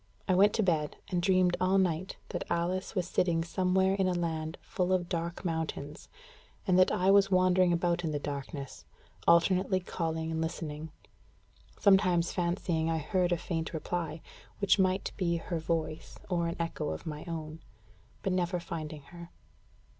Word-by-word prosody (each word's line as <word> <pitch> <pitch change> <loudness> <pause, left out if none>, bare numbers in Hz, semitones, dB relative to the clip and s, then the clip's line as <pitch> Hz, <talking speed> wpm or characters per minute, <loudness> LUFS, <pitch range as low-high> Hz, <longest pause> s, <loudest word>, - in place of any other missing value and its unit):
I 185 - +3
went 200 +3 +5
to 220 - +1
bed, 155 -5 0
and 180 -2 0
dreamed 185 -1 +3
all 185 +1 +3
night 185 -1 0
that - - -4
Alice 180 +4 -1
was 180 -2 0
sitting 170 -3 +1
somewhere 190 +2 +2
in 195 -1 +1
a 180 - +1
land 160 -1 -2
"full 185 0 -1
of 180 -2 +1
dark 170 +1 -3
mountains," 160 -3 -4 0.6
and 185 -2 +4
that 185 - +5
I 185 +2 +3
was 200 0 +5
wandering 185 -1 +4
about 175 0 +1
in 165 - 0
the 150 - -1
darkness, 140 - -6 0.4
alternately 185 +2 +4
calling 160 -2 -3
and 160 0 -1
listening; 160 -1 -4 0.9
sometimes 185 -4 +4
fancying 170 -2 0
I 165 - +1
heard 175 +3 0
a 175 - +3
faint 165 0 -3
reply, 160 -1 -3 0.3
which 200 0 +3
might 185 0 +1
be 170 -2 +1
her 170 0 -3
voice 160 -1 -3
or 170 -1 +1
an 170 - -3
echo 165 0 -2
of 80 0 -5
my 150 -1 -5
own; 160 -1 -5 0.6
but 190 - 0
never 180 -1 0
finding 155 -3 -6
her. 170 +3 -11
170 Hz, 165 wpm, -30 LUFS, 160-185 Hz, 0.9 s, went